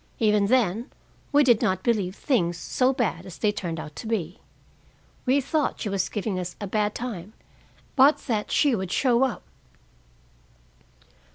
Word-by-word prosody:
Even 210 Hz, -2 st, +3 dB
then, 230 Hz, -2 st, +1 dB, 0.4 s
we 290 Hz, 0 st, +5 dB
did 240 Hz, -5 st, +4 dB
not 185 Hz, 0 st, 0 dB
believe 205 Hz, -6 st, 0 dB
things 175 Hz, -, 0 dB
so 255 Hz, +7 st, +1 dB
bad 230 Hz, -10 st, -1 dB
as 185 Hz, -3 st, -10 dB
they 210 Hz, -, +2 dB
turned 170 Hz, -5 st, -4 dB
out 150 Hz, -1 st, -8 dB
to -, -, -6 dB
be. 185 Hz, -6 st, -2 dB, 0.9 s
We 265 Hz, +3 st, +4 dB
thought 295 Hz, +2 st, -1 dB
she 210 Hz, -, -3 dB
was 195 Hz, -1 st, -1 dB
giving 205 Hz, -3 st, -2 dB
us 180 Hz, -1 st, -5 dB
a 205 Hz, -, -4 dB
bad 210 Hz, +1 st, -1 dB
time, 215 Hz, -5 st, -6 dB, 0.6 s
but 280 Hz, +2 st, +6 dB
that 215 Hz, -5 st, -1 dB
she 285 Hz, -5 st, +3 dB
would 190 Hz, -3 st, -4 dB
show 245 Hz, -2 st, +2 dB
up. 260 Hz, -4 st, -1 dB
210 Hz, 160 wpm, -25 LUFS, 185-250 Hz, 0.9 s, but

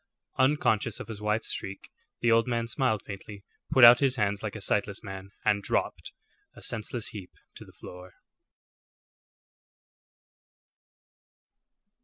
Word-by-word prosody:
Unconscious 130 Hz, -6 st, +2 dB
of -, -, -8 dB
his 105 Hz, -2 st, -7 dB
wife's 105 Hz, +1 st, -1 dB
shriek, 95 Hz, +1 st, -6 dB, 0.3 s
the 120 Hz, -, +3 dB
old 115 Hz, +2 st, +4 dB
man 115 Hz, -1 st, -1 dB
smiled 115 Hz, -4 st, 0 dB
faintly, 100 Hz, 0 st, -9 dB, 0.3 s
put 130 Hz, -, +5 dB
out 120 Hz, +1 st, +10 dB
his 135 Hz, -2 st, +2 dB
hands 105 Hz, -3 st, 0 dB
like 110 Hz, -1 st, -5 dB
a -, -, -5 dB
sightless 100 Hz, +1 st, 0 dB
man, 95 Hz, -1 st, -8 dB, 0.2 s
and 105 Hz, -2 st, +2 dB
dropped, -, -, -2 dB, 0.4 s
a -, -, -14 dB
senseless 115 Hz, +1 st, -3 dB
heap, 100 Hz, -4 st, -9 dB, 0.2 s
to -, -, -10 dB
the -, -, -17 dB
floor. 90 Hz, 0 st, -12 dB
110 Hz, 130 wpm, -28 LUFS, 100-120 Hz, 0.4 s, out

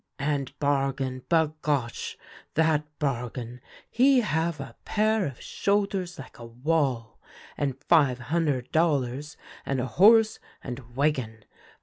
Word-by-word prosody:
And 140 Hz, -2 st, -2 dB
Bargon, 135 Hz, -2 st, 0 dB
bagosh! 150 Hz, -6 st, 0 dB, 0.4 s
that 155 Hz, -1 st, +2 dB
Bargon, 125 Hz, -3 st, -3 dB, 0.3 s
he 260 Hz, +1 st, +4 dB
have 165 Hz, -5 st, -1 dB
a 135 Hz, -4 st, -8 dB
pair 215 Hz, -2 st, +1 dB
of 135 Hz, -4 st, -8 dB
shoulders 195 Hz, -3 st, -1 dB
like 135 Hz, -, -11 dB
a 120 Hz, -, -8 dB
wall, 125 Hz, -2 st, -1 dB, 0.4 s
and 135 Hz, -2 st, -2 dB
five 145 Hz, -7 st, +4 dB
hunder' 140 Hz, 0 st, 0 dB
dollars 145 Hz, -1 st, 0 dB, 0.3 s
and 135 Hz, -1 st, -1 dB
a 125 Hz, -, -1 dB
horse 215 Hz, -, +5 dB, 0.2 s
and 120 Hz, -2 st, -8 dB
wagon. 130 Hz, -7 st, -1 dB
140 Hz, 115 wpm, -27 LUFS, 125-165 Hz, 0.4 s, horse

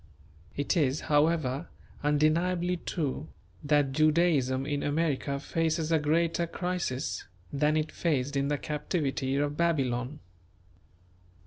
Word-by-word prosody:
It 145 Hz, +6 st, 0 dB
is, 145 Hz, -4 st, +2 dB
however, 150 Hz, -1 st, +1 dB, 0.4 s
undeniably 170 Hz, +5 st, +2 dB
true, 155 Hz, -3 st, -3 dB, 0.4 s
that 145 Hz, -2 st, +2 dB
Judaism 150 Hz, -3 st, +2 dB
in 145 Hz, -1 st, -1 dB
America 145 Hz, -2 st, 0 dB
faces 160 Hz, +2 st, -1 dB
a 160 Hz, -, +4 dB
greater 165 Hz, +3 st, +1 dB
crisis 175 Hz, -7 st, -3 dB, 0.3 s
than 150 Hz, +2 st, +2 dB
it 155 Hz, 0 st, -1 dB
faced 140 Hz, -4 st, -1 dB
in 140 Hz, 0 st, +1 dB
the 145 Hz, 0 st, 0 dB
captivity 145 Hz, -3 st, -2 dB
of 145 Hz, +1 st, 0 dB
Babylon. 135 Hz, -5 st, 0 dB
150 Hz, 110 wpm, -29 LUFS, 140-165 Hz, 0.4 s, a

